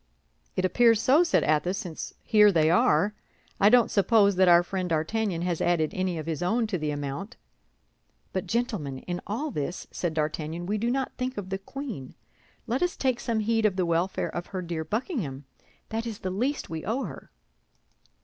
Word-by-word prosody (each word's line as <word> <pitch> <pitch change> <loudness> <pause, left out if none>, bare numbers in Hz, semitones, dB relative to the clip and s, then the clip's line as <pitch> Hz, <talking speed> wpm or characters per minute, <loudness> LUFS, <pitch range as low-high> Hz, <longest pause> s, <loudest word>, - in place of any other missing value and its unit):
"It 185 - +1
appears 230 +3 +4
so," 270 +8 +5
said 335 - +2
Athos, 155 +5 +1
"since 170 -5 -6
here 210 -2 +6
they 160 -3 +3
are. 180 +3 +3 0.5
I 200 - +6
don't 240 0 +5
suppose 200 -1 +4
that 185 0 +5
our 175 0 +7
friend 185 0 -3
D'Artagnan 170 +3 -1
has 175 -2 -1
added 165 -3 +2
any 185 -2 -1
of 155 - -5
his 160 0 -3
own 225 +6 +1
to 180 - +1
the 155 -1 -2
amount." 145 +7 -4 1.0
"But, 190 0 -2
gentlemen, 205 - -2
in 175 +6 -5
all 280 +9 -2
this," 150 - -4
said 170 -3 -3
D'Artagnan, 155 +2 -2
"we 210 +3 -1
do 235 +3 0
not 265 +1 -1
think 255 +1 -2
of 190 -2 -5
the 195 - -2
queen. 220 - -7 0.5
Let 245 +4 -1
us 355 0 0
take 255 -3 0
some 225 -2 -1
heed 225 +1 +1
of 210 -3 +3
the 185 -1 +1
welfare 170 +3 0
of 175 - -4
her 185 -2 -5
dear 165 -2 -3
Buckingham. 165 - -3 0.4
That 225 +1 -3
is 220 -3 -5
the 185 - -2
least 250 +10 -1
we 160 -1 -5
owe 240 +6 -1
her." - - -8
185 Hz, 190 wpm, -27 LUFS, 165-225 Hz, 1.0 s, our